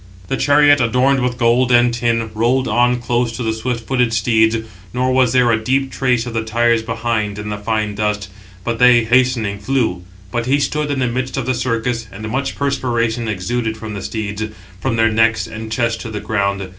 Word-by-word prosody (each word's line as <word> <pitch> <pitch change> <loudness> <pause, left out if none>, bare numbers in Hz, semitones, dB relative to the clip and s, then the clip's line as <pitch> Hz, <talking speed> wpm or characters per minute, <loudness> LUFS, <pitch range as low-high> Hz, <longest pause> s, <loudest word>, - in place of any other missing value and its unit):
The - - 0
chariot, 145 -1 +4
adorned 125 +3 +2
with 125 -1 -1
gold 120 +1 +2
and 120 0 +4
tin, 115 -1 -1
rolled 120 +4 +1
on 125 +2 +2
close 120 0 0
to 125 - -4
the 110 -1 0
swift 115 0 -3
footed 125 -2 +1
steeds; 110 0 +2 0.4
nor 130 +1 +1
was 130 -2 +3
there 125 -1 +3
a 110 -1 0
deep 135 +3 0
trace 125 -3 0
of 120 - -6
the 115 -1 -1
tires 115 +1 +2
behind 115 -2 -2
in 105 0 -5
the 105 - -3
fine 105 0 -1
dust, 105 -1 -2 0.4
but 115 +1 -2
they, 125 -1 +6
hastening, 115 -4 +1
flew. 110 -6 -1 0.3
But 120 +2 -2
he 140 +2 +3
stood 150 +1 -1
in 140 - -1
the 130 -1 +1
midst 125 +2 -3
of 135 - -2
the 130 - 0
circus, 115 -1 -2
and 110 +3 -7
much 135 +3 -2
perspiration 120 -4 -1
exuded 110 +3 -2
from 110 -1 -7
the 100 - -5
steeds, 105 0 -4 0.4
from 130 0 -1
their 115 0 +3
necks 115 +1 +2
and 110 0 -8
chest 115 0 -1
to 115 - -6
the 105 -1 -4
ground. 100 -2 -1
115 Hz, 205 wpm, -18 LUFS, 110-125 Hz, 0.4 s, they